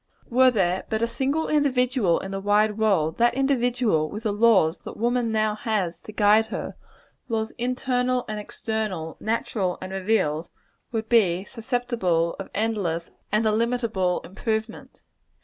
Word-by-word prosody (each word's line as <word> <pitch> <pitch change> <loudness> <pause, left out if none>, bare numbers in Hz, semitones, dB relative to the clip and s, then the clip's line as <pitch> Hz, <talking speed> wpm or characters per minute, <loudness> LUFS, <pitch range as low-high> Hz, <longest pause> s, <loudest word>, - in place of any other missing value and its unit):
Were 255 +2 +6
there 190 -6 +1
but 220 +1 0
a - - +2
single 280 +6 -1
individual 250 - +2
in 195 - -6
the 195 - -3
wide 210 +1 +2
world, 195 -7 +1
that 240 +1 +3
individual, 245 - +1
with 210 +6 -7
the 215 - 0
laws 205 -7 +4
that - - -9
woman 240 0 0
now 215 -1 +1
has 210 -6 -2
to - - -10
guide 210 +1 +4
her - - -5 0.5
laws 220 -1 -1
internal 250 0 0
and 215 0 -4
external, 210 -6 -4
natural 215 -4 -1
and 185 0 -7
revealed 185 -5 0 0.4
would 225 -2 -2
be 190 -6 +3
susceptible 225 -8 -1
of 195 - -6
endless 195 -6 -1 0.2
and 215 +2 +2
illimitable 220 -4 +1
improvement. 220 +4 -4
220 Hz, 145 wpm, -25 LUFS, 190-240 Hz, 0.5 s, Were